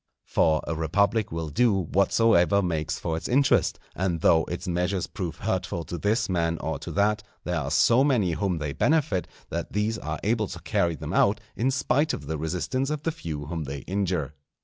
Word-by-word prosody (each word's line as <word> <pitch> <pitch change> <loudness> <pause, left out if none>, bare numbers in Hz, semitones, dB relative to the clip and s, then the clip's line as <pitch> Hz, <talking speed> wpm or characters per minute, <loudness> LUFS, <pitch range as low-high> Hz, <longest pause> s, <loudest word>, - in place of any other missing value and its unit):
For 80 -1 +2
a 80 - -2
republic 100 +7 +1
will 80 -1 -3
do 115 +9 +3
whatsoever 100 +1 +3
makes 80 -3 -1
for 80 -2 -2
its 80 - -4
interest; 140 +3 +3 0.2
and 90 -3 -1
though 80 -1 +4
its 85 - -5
measures 90 +1 0
prove 90 -9 -5
hurtful 90 -4 -2
to 85 - -5
this 110 +6 +1
man 85 -2 0
or 80 -3 -3
to - - -7
that, 105 +1 +2 0.2
there 90 -1 -1
are 70 -2 -3
so 115 - +4
many 120 -11 +2
whom 90 +2 -1
they 75 -2 -3
benefit, 145 - +1 0.2
that 85 0 -4
these 105 +2 0
are 80 0 -4
able 110 0 +1
to - - -8
carry 85 -1 0
them 70 - -6
out, - - +3 0.2
in 125 +4 +1
spite 140 +3 +1
of 75 - -9
the 80 +1 -3
resistance 90 - -1
of 150 -1 -3
the 165 - 0
few 80 - -6
whom 80 0 -4
they 70 0 -5
injure. 90 -5 -2
90 Hz, 195 wpm, -26 LUFS, 80-110 Hz, 0.2 s, though